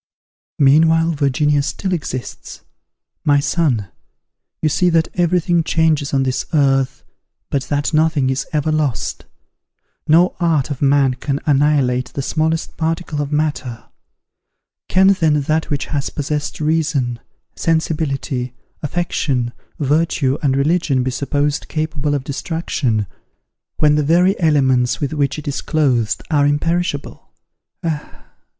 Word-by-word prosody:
"Meanwhile 160 +4 +4
Virginia 145 0 +1
still 185 +6 -3
exists. 130 -7 -5 0.6
My 145 -1 +4
son, 140 - 0 0.7
you 155 - +1
see 180 +4 +2
that 165 -1 +2
every 175 0 +2
thing 170 -1 +1
changes 160 -3 +1
on 135 -1 +2
this 130 -1 -1
earth, 135 -3 +2 0.5
but 135 -2 -1
that 145 +3 -1
nothing 155 -4 +2
is 135 0 -2
ever 155 0 0
lost. 150 -6 -2 0.8
No 170 +4 +4
art 160 -5 +1
of 140 - -5
man 140 -2 +3
can 140 +2 -3
annihilate 140 -3 +2
the 140 - -3
smallest 160 +3 -1
particle 160 -2 -2
of 145 0 -4
matter; 145 -6 -2 1.0
can, 190 +1 +5
then, 160 -6 +3
that 155 +3 0
which 145 -2 -1
has 140 -1 -1
possessed 150 0 -3
reason, 150 -6 0 0.4
sensibility, 140 -6 -1 0.3
affection, 140 -6 -1 0.2
virtue, 145 -2 +1
and 135 -2 +1
religion 140 -3 +1
be 130 - -1
supposed 145 +3 -1
capable 155 -2 -2
of 140 - -2
destruction, 140 - -2 0.7
when 150 -1 +4
the 150 0 +2
very 175 +6 +3
elements 130 -7 +2
with 145 0 -2
which 140 -2 0
it 150 - -8
is 145 - -2
clothed 130 -8 0
are 145 -2 +3
imperishable? 165 +1 -2 0.5
Ah! 155 -3 -5
150 Hz, 130 wpm, -18 LUFS, 135-160 Hz, 1.0 s, can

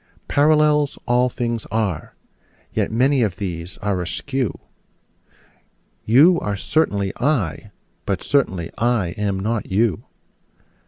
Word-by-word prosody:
Parallels 150 0 +3
all 125 +1 +2
things 120 -2 -3
are: 100 -7 -2 0.6
yet - - 0
many 130 +4 +3
of 105 -6 0
these 90 -1 -5
are 100 -3 0
askew: 130 - -3 1.5
You 150 +10 +6
are 100 -1 -3
certainly 100 -7 0
I: 125 - -1 0.4
but 95 -3 -1
certainly 95 - 0
I 115 -6 +1
am 100 +1 -2
not 110 +3 -2
you. 105 +2 0
115 Hz, 110 wpm, -21 LUFS, 95-135 Hz, 1.5 s, You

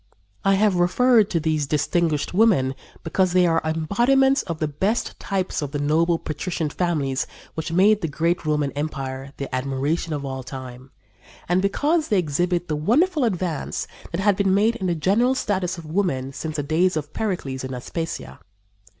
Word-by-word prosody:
I 195 0 +4
have 200 -2 +3
referred 220 +5 +4
to 170 - +1
these 155 -2 0
distinguished 155 +1 0
women 180 -11 +3 0.3
because 180 +2 +1
they 180 -1 +5
are 165 -1 +2
embodiments 240 - +2
of 165 -3 -5
the 155 - -1
best 190 +11 -1
types 190 -4 -2
of 145 -1 -4
the - - 0
noble, 165 +4 +2
patrician 160 0 -3
families 145 -7 -1 0.3
who 160 +1 -4
made 205 +3 +5
the 165 - -1
great 165 +4 0
Roman 150 -2 0
empire 135 -2 -4
the 140 -2 -6
admiration 135 +6 -1
of 145 -2 -3
all 130 -1 -4
time, 130 0 -9 0.6
and 180 +2 +2
because 300 - +1
they 210 - +2
exhibit 175 +2 0
the 155 - -1
wonderful 285 - +2
advance 180 - -2 0.3
that 170 +2 -2
had 205 0 +3
been 195 -1 +2
made 220 +4 +3
in 190 - -2
the 175 - +1
general 215 - +2
status 190 -7 -1
of 165 - -9
women 155 -6 -1
since 155 +2 -5
the 145 - -1
days 160 +4 +2
of 150 0 -5
Pericles 160 -12 -3
and 130 0 -4
Aspasia. 165 +6 -5
170 Hz, 175 wpm, -23 LUFS, 145-195 Hz, 0.6 s, they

